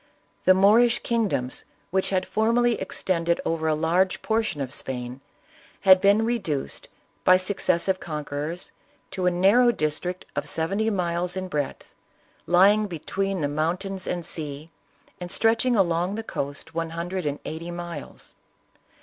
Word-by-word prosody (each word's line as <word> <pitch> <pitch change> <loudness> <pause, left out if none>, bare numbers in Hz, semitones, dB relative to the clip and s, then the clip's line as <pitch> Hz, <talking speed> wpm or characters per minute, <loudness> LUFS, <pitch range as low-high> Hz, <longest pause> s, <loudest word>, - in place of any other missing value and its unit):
The 185 - +7
Moorish 225 +5 +4
kingdom, 210 - 0 0.4
which 190 +1 +1
had 185 -1 0
formerly 235 +2 +2
extend 175 -2 -2
ed 170 - +3
over 160 -1 -1
a 155 - +2
large 170 +4 +1
portion 220 -8 0
of 135 -2 -4
Spain, 125 0 -5 0.6
had 190 -1 +7
been 205 +3 +4
reduced, 205 - -3 0.3
by 185 - +6
successive 185 -1 0
conquerors, 150 +2 -5 0.4
to 185 -2 -1
a - - +6
narrow 200 +8 +4
district 175 0 -2
of - - -3
seventy 195 +7 0
miles 180 -2 -1
in 185 0 -3
breadth, 145 -6 -4 0.5
lying 200 +5 +5
between 190 +2 -3
the 145 - +1
mountains 180 +6 -2
and 175 -2 -3
sea, 150 -1 -3 0.5
and 175 -1 -7
stretching 230 +2 +2
along 180 -1 +1
the 225 - -4
coast 140 -8 -5
one 165 0 -2
hundred 175 +1 -3
and 145 0 -2
eighty 165 +2 -5
miles. 175 -3 -8
180 Hz, 140 wpm, -25 LUFS, 160-195 Hz, 0.6 s, The